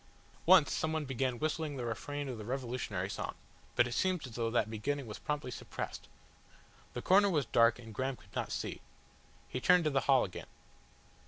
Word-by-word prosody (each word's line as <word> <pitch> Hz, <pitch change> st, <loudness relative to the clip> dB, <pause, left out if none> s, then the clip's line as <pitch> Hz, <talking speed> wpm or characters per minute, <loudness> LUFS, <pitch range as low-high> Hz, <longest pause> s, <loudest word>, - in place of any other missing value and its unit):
Once -, -, +7 dB
someone 160 Hz, -1 st, -1 dB
began 130 Hz, -1 st, -1 dB
whistling 155 Hz, 0 st, -2 dB
the 125 Hz, -, -3 dB
refrain 145 Hz, +5 st, -3 dB
of 125 Hz, -4 st, -5 dB
the -, -, -6 dB
revolutionary 120 Hz, -6 st, -2 dB
song, 100 Hz, -, -4 dB, 0.4 s
but 120 Hz, -, +5 dB
it 125 Hz, -, -4 dB
seemed 180 Hz, +5 st, +1 dB
as 125 Hz, -, -9 dB
though 115 Hz, 0 st, -1 dB
that 115 Hz, -, +2 dB
beginning 135 Hz, +6 st, -2 dB
was 105 Hz, -2 st, -7 dB
promptly 150 Hz, -4 st, -3 dB
suppressed. -, -, -6 dB, 0.9 s
The 120 Hz, -, -5 dB
corner 200 Hz, +2 st, +6 dB
was 150 Hz, -7 st, +1 dB
dark 115 Hz, 0 st, +4 dB
and 115 Hz, -2 st, -10 dB
Graham 130 Hz, +4 st, -1 dB
could -, -, -21 dB
not -, -, -2 dB
see. -, -, -3 dB, 0.7 s
He 130 Hz, -, -4 dB
turned 180 Hz, +5 st, +6 dB
to 155 Hz, -, +1 dB
the 135 Hz, -, +3 dB
hall 135 Hz, -2 st, +6 dB
again. 90 Hz, -, -6 dB
130 Hz, 185 wpm, -33 LUFS, 115-150 Hz, 0.9 s, Once